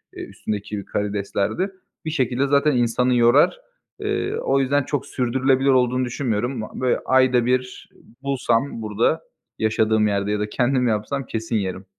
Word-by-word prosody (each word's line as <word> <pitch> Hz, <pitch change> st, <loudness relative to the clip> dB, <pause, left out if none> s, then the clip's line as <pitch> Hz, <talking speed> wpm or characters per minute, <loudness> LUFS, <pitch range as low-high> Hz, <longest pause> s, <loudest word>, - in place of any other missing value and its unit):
eee, -, -, -6 dB
üstündeki 105 Hz, -1 st, -5 dB
karideslerdir. 105 Hz, -, -2 dB, 0.3 s
Bir -, -, -1 dB
şekilde 130 Hz, -2 st, 0 dB
zaten 145 Hz, +2 st, +3 dB
insanı 125 Hz, +1 st, +2 dB
yorar. 120 Hz, -, +4 dB, 0.4 s
Eee, 415 Hz, 0 st, -2 dB
o 135 Hz, -, +1 dB
yüzden 140 Hz, +1 st, +2 dB
çok 140 Hz, -1 st, -3 dB
sürdürülebilir 130 Hz, +1 st, +1 dB
olduğunu 125 Hz, 0 st, +3 dB
düşünmüyorum. 120 Hz, -1 st, -2 dB
B -, -, -4 dB, 0.2 s
böyle 125 Hz, -, +1 dB
ayda 130 Hz, -2 st, +3 dB
bir, 125 Hz, 0 st, -2 dB
ııı, -, -, -22 dB, 0.2 s
bulsam 130 Hz, -3 st, 0 dB
burada, 110 Hz, +9 st, 0 dB, 0.4 s
yaşadığım 110 Hz, 0 st, +2 dB
yerde 100 Hz, 0 st, -1 dB
ya 105 Hz, -, 0 dB
da 105 Hz, 0 st, -2 dB
kendim 125 Hz, +1 st, +1 dB
yapsam 115 Hz, +6 st, -1 dB
kesin 110 Hz, +1 st, -3 dB
yerim. 95 Hz, -2 st, -2 dB
125 Hz, 150 wpm, -22 LUFS, 110-135 Hz, 0.4 s, yorar